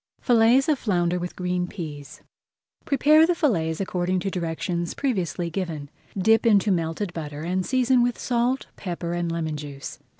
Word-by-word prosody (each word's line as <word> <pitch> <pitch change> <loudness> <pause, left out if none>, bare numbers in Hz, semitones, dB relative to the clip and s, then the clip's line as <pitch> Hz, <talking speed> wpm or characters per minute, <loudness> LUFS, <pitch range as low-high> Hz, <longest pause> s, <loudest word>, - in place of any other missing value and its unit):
FILLETS 240 +3 +4
OF 300 -4 +2
FLOUNDER 180 -4 0
WITH 175 0 -5
GREEN 180 -1 -1
PEAS 150 -6 -8 0.6
Prepare 305 +3 +5
the 355 - +2
fillets 165 - 0
according 185 -1 -1
to 195 - -2
directions 170 0 -3
previously 185 - -1
given, 160 -6 -4 0.3
dip 220 +4 +4
into 210 -3 +4
melted 170 +2 -1
butter, 150 -3 -6
and 185 +2 -1
season 255 +2 +2
with 245 0 +1
salt, 245 +2 0
pepper, 175 -2 -4
and 175 -1 -1
lemon 160 -2 -2
juice. 145 -2 -8
180 Hz, 155 wpm, -24 LUFS, 170-235 Hz, 0.6 s, Prepare